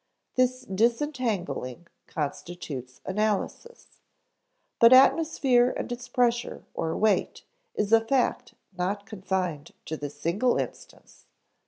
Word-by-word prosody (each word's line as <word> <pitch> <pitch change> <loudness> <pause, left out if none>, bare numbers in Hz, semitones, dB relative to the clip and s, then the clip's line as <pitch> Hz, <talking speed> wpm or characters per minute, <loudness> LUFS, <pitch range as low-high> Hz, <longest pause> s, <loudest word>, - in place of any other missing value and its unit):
This 255 0 +1
disentangling 215 - -1 0.2
constitutes 145 -4 -5
analysis. 215 - -3 0.8
But 230 +1 +8
atmosphere 260 -3 +5
and - - -4
its 245 0 -5
pressure 240 -1 0
or 165 0 -2
weight 215 -2 +1 0.3
is 210 +1 0
a 225 - +7
fact 245 +3 0 0.2
not 195 +3 -2
confined 185 -7 -3
to 160 - -4
this 145 0 -7
single 205 +11 +1
instance. - - -7
210 Hz, 105 wpm, -27 LUFS, 175-245 Hz, 0.8 s, But